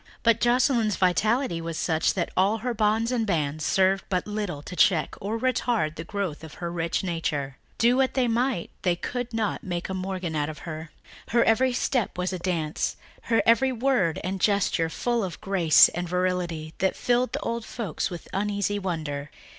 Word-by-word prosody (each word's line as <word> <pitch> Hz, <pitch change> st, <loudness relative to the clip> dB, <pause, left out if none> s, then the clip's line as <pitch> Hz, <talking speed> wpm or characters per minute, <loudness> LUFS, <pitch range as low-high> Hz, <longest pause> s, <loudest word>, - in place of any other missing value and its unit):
But 230 Hz, -1 st, +4 dB
Joscelyn's 240 Hz, -3 st, +3 dB
vitality 195 Hz, +1 st, +1 dB
was 165 Hz, -1 st, -4 dB
such 160 Hz, -1 st, +1 dB
that 175 Hz, -3 st, -1 dB
all 195 Hz, +4 st, +3 dB
her 245 Hz, -, 0 dB
bonds 220 Hz, +2 st, +1 dB
and 240 Hz, -3 st, +1 dB
bands 155 Hz, -4 st, -1 dB
served 190 Hz, +3 st, +2 dB
but 185 Hz, -2 st, 0 dB
little 205 Hz, -8 st, -4 dB
to 180 Hz, -, -8 dB
check 175 Hz, -2 st, +3 dB
or 210 Hz, +3 st, -2 dB
retard 230 Hz, -8 st, 0 dB
the 160 Hz, -, -6 dB
growth 190 Hz, -6 st, -4 dB
of 160 Hz, -, -10 dB
her 170 Hz, -1 st, -4 dB
rich 170 Hz, +1 st, -1 dB
nature. 150 Hz, -6 st, -2 dB, 0.2 s
Do 240 Hz, +2 st, +4 dB
what 265 Hz, -1 st, +2 dB
they 255 Hz, -2 st, +2 dB
might 235 Hz, -4 st, 0 dB
they 180 Hz, -2 st, +2 dB
could 245 Hz, +6 st, -4 dB
not 225 Hz, -2 st, -2 dB
make 175 Hz, -1 st, -4 dB
a -, -, -2 dB
Morgan 185 Hz, -3 st, -3 dB
of 150 Hz, +1 st, -2 dB
her. 160 Hz, +1 st, -7 dB, 0.4 s
Her 235 Hz, +1 st, +3 dB
every 250 Hz, +3 st, +3 dB
step 245 Hz, -4 st, 0 dB
was 180 Hz, +1 st, -1 dB
a 185 Hz, -, -3 dB
dance, 170 Hz, -4 st, -1 dB, 0.3 s
her 225 Hz, -, +3 dB
every 260 Hz, +3 st, +4 dB
word 240 Hz, -9 st, +1 dB
and 190 Hz, +1 st, -3 dB
gesture 195 Hz, -5 st, +2 dB
full 235 Hz, +8 st, -1 dB
of 185 Hz, -3 st, -4 dB
a -, -, -19 dB
grace 180 Hz, -6 st, +5 dB
and 175 Hz, 0 st, -4 dB
virility 180 Hz, -3 st, -1 dB
that 190 Hz, 0 st, +1 dB
filled 245 Hz, +1 st, +1 dB
the -, -, -1 dB
old 230 Hz, 0 st, -2 dB
folks 220 Hz, -8 st, -3 dB
with 175 Hz, -3 st, -8 dB
uneasy 205 Hz, 0 st, 0 dB
wonder. 155 Hz, -6 st, -3 dB
190 Hz, 185 wpm, -26 LUFS, 165-230 Hz, 0.4 s, grace